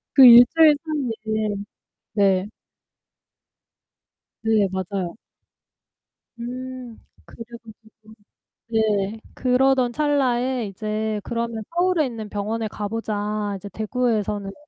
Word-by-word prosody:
그 270 - +9
1 240 0 +10
주일 320 -2 +7
사이에. 220 -8 -2 0.6
네. 195 -2 +2 2.0
네 220 -3 +3
맞아요. 190 -1 -4 1.2
음. 250 0 -7 0.3
그래 230 - -10 0.2
가지고 220 0 -17 0.6
네. 215 -1 0
그러던 255 -1 +2
찰나에 260 -4 0
이제 215 +1 -3
"그러면 230 -1 -3
서울에 350 -3 +2
있는 225 -3 -6
병원에 215 +2 -3
가보자. 210 -1 -3
이제 200 +2 -9
대구에서는 215 -2 -2
큰 - - -12
220 Hz, 195 characters per minute, -22 LUFS, 210-250 Hz, 2.0 s, 1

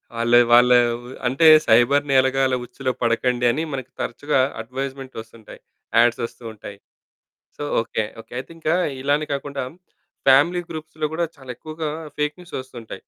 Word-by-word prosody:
వాళ్ళ 115 +1 0 0.2
వాళ్ళ 120 +1 +6 0.6
అంటే 135 +6 +3 0.2
"సైబర్ 120 +5 +4
నేరగాళ్ళ 130 0 +3
ఉచ్చులో 130 +2 -3
పడకండి" 120 +1 +1
అని 150 - -2
మనకి 130 -1 -6
తరచుగా 145 +4 -1 0.2
అడ్వైజ్మెంట్ 130 +2 -6
వస్తుంటాయి. 110 -1 -14 0.4
అడ్స్ 120 0 +2
వస్తూ 115 - -12
ఉంటాయి. 100 -1 -10 0.8
So - - -7 0.2
okay 110 -1 -2 0.2
okay. - - -26
అయితే - - -12
ఇంక 160 - -4 0.3
ఇలానే 145 +2 +1
కాకుండా 140 -1 -4 0.7
ఫ్యామిలీ 150 +7 +5
గ్రూప్స్‌లో 155 -1 -4
కూడా 170 +1 0
చాలా 130 -2 -11
ఎక్కువగా 155 0 -5 0.3
ఫేక్ 150 0 -1
న్యూస్ 175 - -9
వస్తుంటాయి. 120 -4 -10
130 Hz, 140 wpm, -22 LUFS, 120-150 Hz, 0.8 s, వాళ్ళ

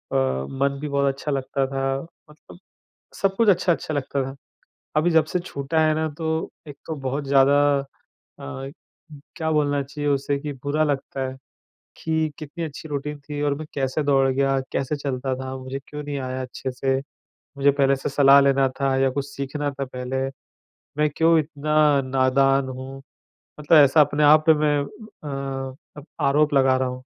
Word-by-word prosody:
मन 70 - 0
भी 150 - -3
बहुत 140 -1 +1
अच्छा 145 +2 -5
लगता 135 0 -1
था, 135 0 -2 0.3
मतलब 150 +3 -16 0.6
सब 195 -1 +2
कुछ 230 +1 +3
अच्छा-अच्छा 175 -4 +1
लगता 140 -1 -1
था। 135 +1 -6 0.6
अभी 160 +3 +3
जब 160 -2 +4
से 155 +4 -2
छूटा 160 -3 -2
है 155 - +2
ना 160 0 -1
तो 160 0 -2 0.2
एक 145 - -9
तो 160 - -3
बहुत 140 +3 -2
ज़्यादा 140 +1 +5 0.2
अ, 135 - -10 0.7
क्या 160 -2 -1
बोलना 145 -2 +1
चाहिए 145 +2 -4
उसे 140 0 0
कि 145 +1 -5
बुरा 150 +2 +1
लगता 140 -2 -2
है, 130 - -7 0.6
कि 160 -1 0
कितनी 160 +2 -6
अच्छी 160 0 -8
रूटीन 150 0 -4
थी 145 +1 -6
और 145 -1 +1
मैं 155 - -7
कैसे 135 +2 -1
दौड़ 135 -2 +3
गया? 135 0 +1
कैसे 135 +3 -1
चलता 135 -2 -2
था? 130 0 -5
मुझे 130 +1 -5
क्यों 150 0 -6
नहीं 145 -1 -4
आया 130 0 -4
अच्छे 130 +1 -5
से? 135 +1 0 0.6
मुझे 140 +1 +4
पहले 140 -1 +2
से 135 - -4
सलाह 140 0 +6
लेना 135 -1 +3
था 135 -1 +2
या 135 0 +3
कुछ 140 +1 -3
सीखना 140 +1 -3
था 140 0 -4
पहले, 125 0 -5 0.8
मैं 150 0 +3
क्यों 165 0 +4
इतना 150 0 -3 0.3
नादान 135 +1 +2
हूँ? 130 +1 -7 0.6
मतलब 150 +2 +5
ऐसा 150 +1 +7
अपने 145 +1 +2
आप 155 +1 +7
पे - - +9
मैं 150 -1 +2
एह, 140 - -6 0.3
अ, - - -16 0.2
आरोप 150 +2 +3
लगा 135 -1 +4
रहा 130 0 0
हूँ 125 0 -7
140 Hz, 175 wpm, -23 LUFS, 135-150 Hz, 0.8 s, पे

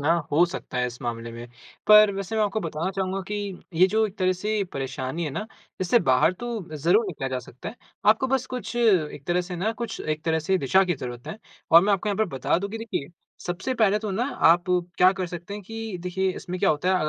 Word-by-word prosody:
ना 150 +4 +3 0.2
हो 160 +4 +6
सकता 175 -7 -6
है 125 - +1
इस 120 0 -8
मामले 115 -1 -4
में। 120 +1 -8 0.4
पर 210 -1 +8
वैसे 195 +2 -4
मैं 215 - +3
आपको 210 +1 -1
बताना 165 +1 -3
चाहूँगा 190 0 -2
कि 210 0 -2 0.4
ये 180 +3 +6
जो 220 +3 +2
एक 200 - -11
तरह 185 0 +3
से 210 +2 -1
परेशानी 135 +4 -3
है 150 - -3
ना 215 +10 -4 0.3
इससे 185 +6 +4
बाहर 155 +7 +4
तो 240 0 -4 0.3
ज़रूर 180 +9 +3
निकला 145 -7 -4
जा 130 -1 -2
सकता 125 0 -9
है, - - -10 0.3
आपको 220 +5 +5
बस 265 -1 0
कुछ 250 -1 -5
एक 180 - +2
तरह 175 +1 +2
से 180 0 -6
ना 210 +6 0
कुछ 235 +1 -5
एक 155 0 -3
तरह 160 -1 +2
से 185 +4 +1
दिशा 190 +6 +3
की 180 -2 0
ज़रूरत 125 -2 -7
है। 160 +7 -6 0.3
और 170 +1 +9
मैं 205 +2 +2
आपको 200 +2 0
यहाँ 200 - 0
पर 220 - +4
बता 135 - +1
दूँ 200 +2 -4
कि 225 - -5
देखिए 220 -11 -4 0.4
सबसे 180 +8 -2
पहले 210 -3 +3
तो 215 -1 -4
ना 210 +6 0 0.2
आप 175 +1 +5 0.3
क्या 180 +1 +6
कर 190 -1 -3
सकते 175 +3 -7
हैं 205 - -7
कि 225 0 -6
देखिए 190 +1 0
इसमें 180 +1 -5
क्या 195 - +4
होता 150 +4 0
है 190 - +4
185 Hz, 240 wpm, -25 LUFS, 155-210 Hz, 0.4 s, और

